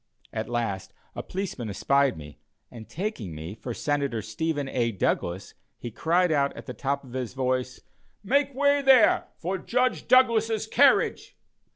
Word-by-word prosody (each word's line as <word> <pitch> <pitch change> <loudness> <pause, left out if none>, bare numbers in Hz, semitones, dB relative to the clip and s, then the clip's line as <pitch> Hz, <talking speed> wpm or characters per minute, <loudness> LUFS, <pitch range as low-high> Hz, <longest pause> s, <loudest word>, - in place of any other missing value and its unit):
At 110 +1 -4
last, 115 -6 -3 0.2
a - - -5
policeman 180 - -5
espied 140 +5 +1
me, 75 -1 -11 0.3
and 115 -2 -11
taking 150 - -4
me 80 +5 -7
for 115 +3 -7
Senator 140 -3 -2
Stephen 145 +6 -2
A. 120 -3 0
Douglas, 95 -2 -2 0.2
he 120 - -7
cried 170 - +1
out, 140 -2 +1
at - - -9
the 125 - -6
top 140 +4 -2
of 125 -3 -13
his 125 -1 -4
voice: 130 -1 -2 0.4
"Make 280 +5 +1
way 285 +1 +3
there 265 -3 +5
for 185 +3 -3
Judge 250 +1 0
Douglas's 225 -4 +3
carriage." 265 +5 +2
140 Hz, 155 wpm, -26 LUFS, -, 0.4 s, there